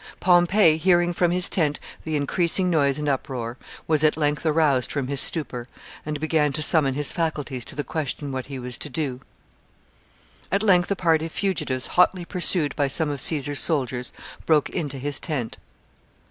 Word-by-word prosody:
Pompey, 175 Hz, -1 st, +4 dB
hearing 175 Hz, 0 st, +2 dB
from 175 Hz, 0 st, +1 dB
his 180 Hz, +1 st, +2 dB
tent 150 Hz, -5 st, 0 dB, 0.3 s
the 160 Hz, -1 st, -2 dB
increasing 175 Hz, +5 st, +1 dB
noise 140 Hz, -4 st, +2 dB
and 150 Hz, 0 st, -3 dB
uproar, 125 Hz, -3 st, -3 dB, 0.3 s
was 155 Hz, -1 st, +2 dB
at 155 Hz, 0 st, +3 dB
length 150 Hz, -1 st, 0 dB
aroused 150 Hz, -5 st, +2 dB
from 135 Hz, -3 st, -3 dB
his 140 Hz, -1 st, +2 dB
stupor, 125 Hz, -7 st, -1 dB, 0.4 s
and 150 Hz, -1 st, -4 dB
began 155 Hz, -1 st, +1 dB
to 155 Hz, -, 0 dB
summon 145 Hz, -4 st, +4 dB
his 145 Hz, 0 st, 0 dB
faculties 150 Hz, -6 st, -3 dB
to -, -, -11 dB
the 145 Hz, -, -3 dB
question 145 Hz, -2 st, -4 dB
what 130 Hz, -1 st, -5 dB
he 135 Hz, -1 st, -6 dB
was 125 Hz, -1 st, -4 dB
to 150 Hz, -, -5 dB
do. 135 Hz, -3 st, -3 dB, 1.3 s
At 200 Hz, +2 st, +1 dB
length 180 Hz, -4 st, +3 dB
a 200 Hz, -, +1 dB
party 165 Hz, -3 st, +1 dB
of -, -, -13 dB
fugitives, 155 Hz, -11 st, -1 dB
hotly 180 Hz, 0 st, +2 dB
pursued 170 Hz, -5 st, -1 dB
by 145 Hz, -, +1 dB
some 150 Hz, +2 st, +1 dB
of 140 Hz, -2 st, -3 dB
Caesar's 145 Hz, -2 st, +1 dB
soldiers, 130 Hz, -6 st, -1 dB, 0.4 s
broke 155 Hz, -3 st, +2 dB
into 145 Hz, -6 st, -4 dB
his 145 Hz, +2 st, -1 dB
tent. 140 Hz, -9 st, -4 dB
150 Hz, 175 wpm, -23 LUFS, 140-170 Hz, 1.3 s, Pompey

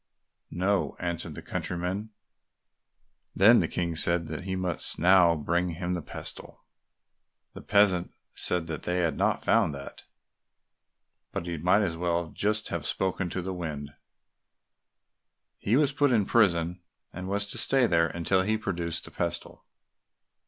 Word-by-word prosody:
"No," 95 Hz, +2 st, -1 dB
answered 85 Hz, -3 st, -4 dB
the -, -, -9 dB
countryman. 90 Hz, +5 st, -4 dB, 1.3 s
Then 110 Hz, +5 st, +6 dB
the -, -, +1 dB
King 85 Hz, -2 st, -2 dB
said 85 Hz, +1 st, +5 dB
that 80 Hz, +3 st, -6 dB
he 95 Hz, -1 st, -2 dB
must 90 Hz, -3 st, -1 dB
now 90 Hz, -1 st, +5 dB
bring 85 Hz, +3 st, -1 dB
him 90 Hz, +1 st, -3 dB
the 90 Hz, -, -3 dB
pestle. -, -, -7 dB, 0.9 s
The -, -, -10 dB
peasant 100 Hz, -4 st, +2 dB, 0.2 s
said 90 Hz, -2 st, +2 dB
they 80 Hz, +2 st, -4 dB
had 85 Hz, -4 st, 0 dB
not -, -, 0 dB
found 75 Hz, -, +2 dB
that, 70 Hz, 0 st, -10 dB, 1.3 s
but -, -, -4 dB
he 85 Hz, -2 st, -4 dB
might 90 Hz, +6 st, +3 dB
just 100 Hz, -5 st, 0 dB
as -, -, -8 dB
well 85 Hz, -1 st, -2 dB, 0.4 s
have -, -, -3 dB
spoken 95 Hz, -1 st, -1 dB
to 90 Hz, +1 st, -4 dB
the 95 Hz, +1 st, -4 dB
wind; 75 Hz, -5 st, -5 dB, 1.7 s
he 110 Hz, -, +1 dB
was 145 Hz, 0 st, +3 dB
put 145 Hz, -1 st, +2 dB
in 110 Hz, -5 st, +2 dB
prison, 90 Hz, -6 st, +2 dB, 0.3 s
and 95 Hz, +1 st, -6 dB
was 100 Hz, +1 st, -1 dB
to -, -, -3 dB
stay 135 Hz, -2 st, +3 dB
there 85 Hz, -5 st, +2 dB
until 85 Hz, +3 st, 0 dB
he 110 Hz, +3 st, 0 dB
produced 85 Hz, -5 st, -3 dB
the -, -, -12 dB
pestle. -, -, -4 dB
90 Hz, 145 wpm, -27 LUFS, 85-95 Hz, 1.7 s, Then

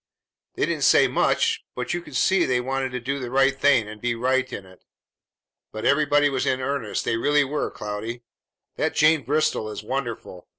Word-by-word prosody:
They -, -, +1 dB
didn't -, -, -2 dB
say -, -, +5 dB
much, 455 Hz, -1 st, +1 dB
but -, -, -3 dB
you 175 Hz, -, -2 dB
could 150 Hz, -, -12 dB
see 185 Hz, +9 st, +3 dB
they 125 Hz, -4 st, +1 dB
wanted 135 Hz, +1 st, -2 dB
to 125 Hz, -, -2 dB
do 135 Hz, +4 st, -3 dB
the 125 Hz, -2 st, -5 dB
right 135 Hz, +1 st, +3 dB
thing 135 Hz, -5 st, +3 dB
and 105 Hz, 0 st, -10 dB
be 120 Hz, -1 st, -1 dB
right 130 Hz, +2 st, 0 dB
in 95 Hz, -, -7 dB
it. 95 Hz, -1 st, -18 dB, 0.9 s
But 110 Hz, -, -6 dB
everybody 145 Hz, 0 st, +3 dB
was 135 Hz, -2 st, -1 dB
in 130 Hz, -, +1 dB
earnest; 130 Hz, -5 st, -3 dB
they 115 Hz, -, 0 dB
really 145 Hz, +5 st, +3 dB
were, 145 Hz, +2 st, -2 dB
Cloudy. 110 Hz, +3 st, -6 dB, 0.5 s
That -, -, -1 dB
Jane 155 Hz, 0 st, +4 dB
Bristol 135 Hz, -4 st, 0 dB
is 105 Hz, 0 st, -7 dB
wonderful! 120 Hz, -7 st, -5 dB
130 Hz, 195 wpm, -24 LUFS, 115-145 Hz, 0.9 s, say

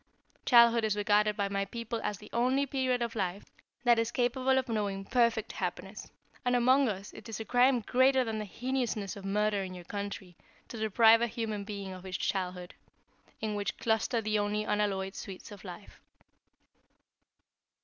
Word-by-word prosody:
Childhood 235 Hz, -1 st, +6 dB
is 215 Hz, -2 st, +1 dB
regarded 210 Hz, 0 st, +2 dB
by 200 Hz, -1 st, 0 dB
my 195 Hz, 0 st, -1 dB
people 230 Hz, +3 st, -5 dB
as 210 Hz, -, -2 dB
the 210 Hz, -, -14 dB
only 255 Hz, +4 st, +2 dB
period 260 Hz, -2 st, 0 dB
of 235 Hz, -1 st, -3 dB
life 190 Hz, -1 st, -2 dB, 0.4 s
that 240 Hz, -2 st, +5 dB
is 230 Hz, 0 st, 0 dB
capable 255 Hz, +2 st, +1 dB
of 260 Hz, 0 st, 0 dB
knowing 200 Hz, -4 st, -2 dB
perfect 235 Hz, -1 st, +1 dB
happiness, -, -, -5 dB, 0.3 s
and 250 Hz, 0 st, +2 dB
among 255 Hz, +2 st, +4 dB
us 200 Hz, 0 st, -6 dB
it -, -, -11 dB
is 225 Hz, -, -5 dB
a 225 Hz, -, -5 dB
crime 245 Hz, +1 st, +3 dB
greater 260 Hz, +3 st, +3 dB
than 220 Hz, -2 st, -3 dB
the 215 Hz, -, -4 dB
heinousness 235 Hz, -2 st, -3 dB
of 200 Hz, -1 st, -9 dB
murder 205 Hz, +1 st, +1 dB
in 185 Hz, -1 st, -6 dB
your 180 Hz, -, -9 dB
country, 200 Hz, -1 st, -6 dB, 0.3 s
to 230 Hz, -, -7 dB
deprive 225 Hz, +1 st, +5 dB
a 235 Hz, -, +2 dB
human 220 Hz, -3 st, -4 dB
being 200 Hz, -2 st, -6 dB
of 185 Hz, -1 st, -10 dB
its 185 Hz, -1 st, -4 dB
childhood 180 Hz, -2 st, -3 dB, 0.7 s
in 215 Hz, -1 st, -2 dB
which 205 Hz, -1 st, -3 dB
cluster 225 Hz, +1 st, 0 dB
the 215 Hz, -1 st, 0 dB
only 205 Hz, +1 st, 0 dB
unalloyed 200 Hz, -2 st, -1 dB
sweets 195 Hz, 0 st, -8 dB
of 205 Hz, -2 st, -11 dB
life. 185 Hz, +1 st, -11 dB
215 Hz, 175 wpm, -30 LUFS, 200-235 Hz, 0.7 s, Childhood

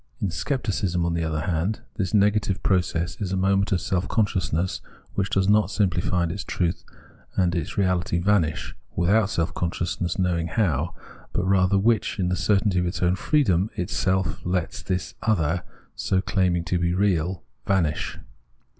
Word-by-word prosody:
In 95 Hz, -, -1 dB
Scepticism, 95 Hz, -, -1 dB
on 85 Hz, -, 0 dB
the 85 Hz, 0 st, 0 dB
other 80 Hz, -1 st, -1 dB
hand, 90 Hz, +4 st, -1 dB, 0.2 s
this 95 Hz, -4 st, -1 dB
negative 105 Hz, -2 st, +2 dB
process 90 Hz, -1 st, 0 dB
is 95 Hz, -3 st, -2 dB
a 95 Hz, -, 0 dB
moment 95 Hz, +2 st, +2 dB
of 95 Hz, -, +2 dB
self 90 Hz, +1 st, -1 dB
consciousness, 95 Hz, -5 st, 0 dB, 0.3 s
which 95 Hz, -1 st, -1 dB
does 95 Hz, 0 st, +1 dB
not 105 Hz, -2 st, +4 dB
simply 95 Hz, -5 st, +1 dB
find 85 Hz, -2 st, 0 dB
its 95 Hz, +3 st, -4 dB
truth 85 Hz, -1 st, -1 dB, 0.5 s
and 90 Hz, -2 st, +2 dB
its 85 Hz, -4 st, -3 dB
reality 90 Hz, -3 st, +1 dB
vanish, 85 Hz, -6 st, +1 dB, 0.2 s
without 100 Hz, +4 st, +3 dB
self 85 Hz, -4 st, -1 dB
consciousness 90 Hz, 0 st, -2 dB
knowing 90 Hz, -3 st, +1 dB
how, 85 Hz, -, 0 dB, 0.4 s
but -, -, 0 dB
rather 95 Hz, 0 st, +3 dB
which, 110 Hz, +2 st, +2 dB
in 90 Hz, -3 st, 0 dB
the 90 Hz, -, +1 dB
certainty 100 Hz, -1 st, +2 dB
of 90 Hz, -, 0 dB
its 85 Hz, -, -3 dB
own 90 Hz, 0 st, +3 dB
freedom, 100 Hz, -, +2 dB
itself 95 Hz, +1 st, 0 dB
lets 90 Hz, -1 st, -2 dB
this 90 Hz, -1 st, -3 dB
other, 90 Hz, -6 st, +1 dB, 0.3 s
so 95 Hz, -, 0 dB
claiming 90 Hz, -3 st, +1 dB
to 90 Hz, +1 st, -1 dB
be 85 Hz, 0 st, +1 dB
real, 90 Hz, -2 st, +1 dB, 0.2 s
vanish. 85 Hz, -6 st, 0 dB
90 Hz, 165 wpm, -25 LUFS, 85-100 Hz, 0.5 s, not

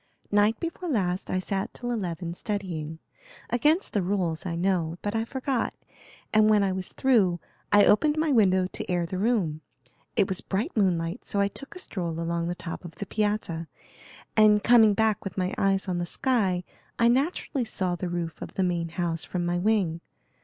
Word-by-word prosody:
"Night 205 Hz, +2 st, +3 dB
before 340 Hz, +1 st, -4 dB
last 185 Hz, -, -1 dB
I -, -, 0 dB
sat 195 Hz, +1 st, -3 dB
till 245 Hz, -1 st, -4 dB
eleven, 175 Hz, -6 st, -3 dB
studying. 175 Hz, -6 st, -4 dB, 0.5 s
Against 300 Hz, -, +2 dB
the 205 Hz, -, +2 dB
rules, 180 Hz, -3 st, -1 dB
I 170 Hz, -, -2 dB
know; 170 Hz, -2 st, 0 dB
but 205 Hz, -, -1 dB
I 225 Hz, 0 st, 0 dB
forgot, 260 Hz, 0 st, -2 dB, 0.6 s
and 215 Hz, 0 st, +5 dB
when 210 Hz, -2 st, +5 dB
I 195 Hz, -, +1 dB
was 185 Hz, -1 st, -4 dB
through 205 Hz, -10 st, +3 dB, 0.3 s
I 205 Hz, 0 st, +7 dB
opened 295 Hz, +8 st, +4 dB
my 310 Hz, -1 st, +1 dB
window 190 Hz, -6 st, +4 dB
to 185 Hz, -, -6 dB
air 175 Hz, -1 st, +1 dB
the 185 Hz, +2 st, -4 dB
room. 190 Hz, -9 st, +1 dB, 0.5 s
It 190 Hz, -, +3 dB
was 190 Hz, -2 st, -2 dB
bright 215 Hz, -, -2 dB
moonlight, 175 Hz, -5 st, 0 dB
so 200 Hz, -, 0 dB
I 200 Hz, 0 st, +3 dB
took 275 Hz, -, -9 dB
a -, -, -6 dB
stroll 170 Hz, -, -3 dB
along 170 Hz, 0 st, -1 dB
the 175 Hz, -, -2 dB
top 170 Hz, 0 st, -6 dB
of 175 Hz, -2 st, -9 dB
the 205 Hz, -, -5 dB
piazza, 205 Hz, -6 st, -1 dB, 0.7 s
and 210 Hz, -1 st, +5 dB
coming 225 Hz, -3 st, +6 dB
back 220 Hz, -1 st, +1 dB
with 195 Hz, -1 st, -6 dB
my 185 Hz, +1 st, 0 dB
eyes 195 Hz, 0 st, +1 dB
on 180 Hz, -1 st, -1 dB
the 175 Hz, -, -2 dB
sky 195 Hz, -7 st, +1 dB, 0.3 s
I 235 Hz, -, +4 dB
naturally 270 Hz, +1 st, +1 dB
saw 185 Hz, -5 st, -2 dB
the 175 Hz, +1 st, -4 dB
roof 170 Hz, -2 st, -4 dB
of -, -, -7 dB
the 190 Hz, -, +1 dB
main 170 Hz, -2 st, 0 dB
house 165 Hz, -2 st, -2 dB
from 175 Hz, +2 st, -3 dB
my 175 Hz, 0 st, 0 dB
wing. 185 Hz, -5 st, +1 dB
195 Hz, 190 wpm, -27 LUFS, 175-220 Hz, 0.7 s, I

